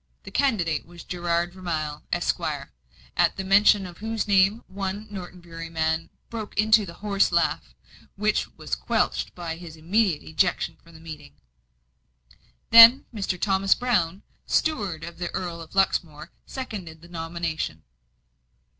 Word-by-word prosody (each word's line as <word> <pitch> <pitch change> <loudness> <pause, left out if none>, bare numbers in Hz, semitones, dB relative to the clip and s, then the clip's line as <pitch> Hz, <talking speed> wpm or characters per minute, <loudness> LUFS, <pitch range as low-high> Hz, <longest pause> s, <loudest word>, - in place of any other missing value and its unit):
The - - -10
candidate 180 - 0
was 170 0 -12
Gerard 175 0 -1
Vermilye, 155 -5 -3
Esquire; - - -2 0.4
at - - +2
the 190 - -3
mention 195 +1 +5
of 175 -2 -10
whose 220 0 -2
name 200 +3 +3
one 195 +2 -4
Norton 180 -2 -8
Bury 165 -1 -8
man 160 0 -1 0.2
broke 220 -3 -6
into 215 -2 +4
a - - -8
horse 200 +1 +1
laugh, 160 - 0 0.4
which 210 +1 +1
was - - -7
quenched - - -1
by 170 -2 -5
his 170 -2 -10
immediate 180 0 +1
ejection 175 +3 0
from 165 0 -18
the - - -12
meeting. 155 - -10 1.4
Then, 230 +3 +10
Mr. 195 -4 -2
Thomas 195 0 +3
Brown, 200 -7 0 0.2
steward 205 - 0
of 170 +1 -8
the 175 - -2
Earl 175 -2 -4
of 165 - -12
Luxmore, 170 -5 0 0.2
seconded 185 - -7
the - - -12
nomination. 165 - -4
180 Hz, 140 wpm, -25 LUFS, 165-205 Hz, 1.4 s, Then